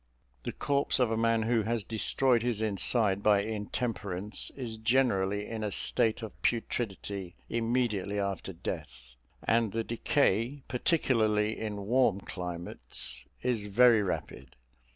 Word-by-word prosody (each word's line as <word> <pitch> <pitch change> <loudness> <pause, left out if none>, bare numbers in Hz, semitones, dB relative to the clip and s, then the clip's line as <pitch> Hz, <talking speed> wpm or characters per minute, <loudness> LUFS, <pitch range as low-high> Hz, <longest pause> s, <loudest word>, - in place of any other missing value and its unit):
The - - -4
corpse 140 0 +1
of 125 -3 +3
a - - +1
man 115 0 +2
who 115 0 +2
has 115 0 -1
destroyed 115 +3 +2
his 120 -2 -1
inside 105 -1 +2
by 100 -1 +4
intemperance 105 -2 -2
is 115 -4 -5
generally 105 -4 +1
in 110 -1 -4
a 105 - -2
state 115 +2 +1
of 110 - -6
putridity 100 -5 -2
immediately 115 -4 0
after 100 -1 -3
death; 65 -7 -7 0.3
and 115 -3 +2
the 115 0 0
decay, 120 +2 +1
particularly 110 -7 +1
in 105 -2 -4
warm 115 -3 +3
climates, 85 -9 -3 0.2
is 120 -5 -1
very 115 +2 +6
rapid. 70 -9 -4
110 Hz, 130 wpm, -30 LUFS, 100-120 Hz, 0.3 s, very